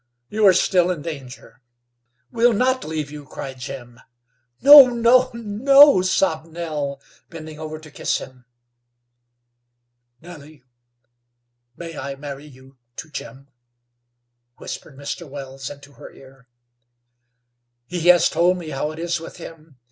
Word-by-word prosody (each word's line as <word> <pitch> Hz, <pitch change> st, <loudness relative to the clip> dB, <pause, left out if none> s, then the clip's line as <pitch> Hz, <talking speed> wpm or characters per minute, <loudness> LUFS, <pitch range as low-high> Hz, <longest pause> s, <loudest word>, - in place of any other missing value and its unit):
"You 215 Hz, -1 st, +2 dB
are 190 Hz, -, +7 dB
still 180 Hz, 0 st, +2 dB
in 170 Hz, -5 st, -3 dB
danger." 135 Hz, -6 st, -10 dB, 0.7 s
"We'll 240 Hz, -1 st, +3 dB
not 255 Hz, +4 st, 0 dB
leave 155 Hz, -2 st, -5 dB
you," 150 Hz, -1 st, -9 dB
cried 135 Hz, -1 st, -9 dB
Jim. 120 Hz, -2 st, -9 dB, 0.6 s
"No, 285 Hz, -1 st, +10 dB
no, 245 Hz, +1 st, +3 dB
no," 250 Hz, +3 st, +5 dB
sobbed 180 Hz, -3 st, 0 dB
Nell, 155 Hz, -4 st, -5 dB, 0.3 s
bending 155 Hz, -2 st, -10 dB
over 155 Hz, 0 st, -7 dB
to 155 Hz, -1 st, -15 dB
kiss -, -, -2 dB
him. 130 Hz, -2 st, -12 dB, 1.7 s
"Nellie, 155 Hz, -4 st, -14 dB, 1.1 s
may 165 Hz, -1 st, -8 dB
I 135 Hz, +1 st, -6 dB
marry 140 Hz, +1 st, -9 dB
you 130 Hz, -1 st, -19 dB, 0.2 s
to 155 Hz, -, -9 dB
Jim?" 135 Hz, 0 st, -9 dB, 1.1 s
whispered 140 Hz, -, -9 dB
Mr. 145 Hz, +3 st, -7 dB
Wells 135 Hz, -1 st, -8 dB
into 145 Hz, 0 st, -13 dB
her -, -, -13 dB
ear. 135 Hz, -1 st, -18 dB, 1.4 s
"He 175 Hz, +3 st, -4 dB
has 175 Hz, -1 st, +6 dB
told 180 Hz, +2 st, +1 dB
me 170 Hz, -3 st, -8 dB
how 140 Hz, +2 st, -3 dB
it 155 Hz, -, -9 dB
is 170 Hz, 0 st, -2 dB
with 165 Hz, -, -11 dB
him. 160 Hz, -4 st, -13 dB
155 Hz, 130 wpm, -21 LUFS, 140-180 Hz, 1.7 s, No